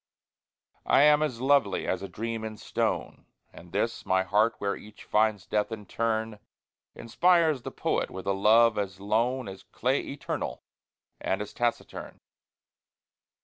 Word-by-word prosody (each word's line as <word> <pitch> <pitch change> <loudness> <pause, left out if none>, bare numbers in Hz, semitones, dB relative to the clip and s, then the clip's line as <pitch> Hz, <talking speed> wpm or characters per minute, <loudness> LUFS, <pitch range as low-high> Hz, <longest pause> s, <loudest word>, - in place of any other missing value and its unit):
I 140 - +5
am 150 0 +6
as 130 -6 -2
lovely 135 -7 +2
as 95 - -1
a 100 - -6
dream 115 +3 -4
in 110 -1 -6
stone, - - -2 0.3
And - - -14
this - - -1
my 95 0 +2
heart 105 +4 +2
where 100 0 -1
each 105 0 -13
finds 105 -3 +1
death 105 +1 -1
in 105 -2 -6
turn, 110 0 -2 0.6
Inspires 160 +3 +2
the - - -5
poet - - -1
with 95 - -8
a 100 - +1
love 110 +3 +4
as 100 -2 -4
lone 115 +5 0
As 95 -1 -8
clay 130 +3 -1
eternal 140 - -4 0.6
and 95 - -1
as 105 0 -6
taciturn. 120 -1 -3
110 Hz, 145 wpm, -28 LUFS, 100-120 Hz, 0.6 s, am